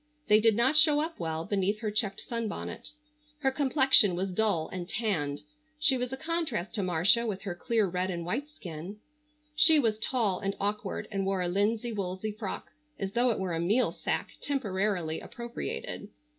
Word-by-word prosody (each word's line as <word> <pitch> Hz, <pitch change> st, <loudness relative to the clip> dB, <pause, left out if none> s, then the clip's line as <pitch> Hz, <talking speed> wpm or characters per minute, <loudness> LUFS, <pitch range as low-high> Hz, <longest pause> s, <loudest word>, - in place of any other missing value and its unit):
They 210 Hz, 0 st, +7 dB
did 220 Hz, -1 st, +4 dB
not 250 Hz, +6 st, +3 dB
show 305 Hz, -1 st, +6 dB
up 320 Hz, +2 st, -3 dB
well 160 Hz, -1 st, -3 dB
beneath 205 Hz, +2 st, 0 dB
her 215 Hz, -2 st, -2 dB
checked 210 Hz, -2 st, -1 dB
sunbonnet. 230 Hz, -3 st, -5 dB, 0.5 s
Her 270 Hz, -2 st, +2 dB
complexion 265 Hz, -, +4 dB
was 185 Hz, +1 st, -2 dB
dull 195 Hz, -6 st, +1 dB
and 180 Hz, -1 st, -6 dB
tanned. 175 Hz, -11 st, -1 dB, 0.4 s
She 300 Hz, -2 st, +4 dB
was 250 Hz, 0 st, -2 dB
a 265 Hz, -, -4 dB
contrast 300 Hz, -, -2 dB
to 215 Hz, -, 0 dB
Marcia 185 Hz, +6 st, +3 dB
with 200 Hz, -3 st, -4 dB
her 195 Hz, -4 st, -3 dB
clear 220 Hz, +5 st, +1 dB
red 180 Hz, +1 st, -1 dB
and 170 Hz, -2 st, -4 dB
white 260 Hz, -, -2 dB
skin. 185 Hz, -, -8 dB, 0.6 s
She 315 Hz, 0 st, +7 dB
was 225 Hz, -6 st, +1 dB
tall 220 Hz, -5 st, +1 dB
and 195 Hz, 0 st, -2 dB
awkward 205 Hz, 0 st, -2 dB
and 195 Hz, -1 st, -1 dB
wore 190 Hz, -1 st, 0 dB
a -, -, 0 dB
linsey 215 Hz, +6 st, 0 dB
woolsey 195 Hz, 0 st, -3 dB
frock 210 Hz, -2 st, -6 dB, 0.3 s
as 195 Hz, 0 st, -3 dB
though 245 Hz, +4 st, +2 dB
it 230 Hz, -, 0 dB
were 185 Hz, -2 st, -2 dB
a 165 Hz, -, -1 dB
meal 210 Hz, +9 st, +2 dB
sack -, -, -2 dB
temporarily 195 Hz, -, -1 dB
appropriated. 435 Hz, -, -6 dB
210 Hz, 180 wpm, -29 LUFS, 185-245 Hz, 0.6 s, They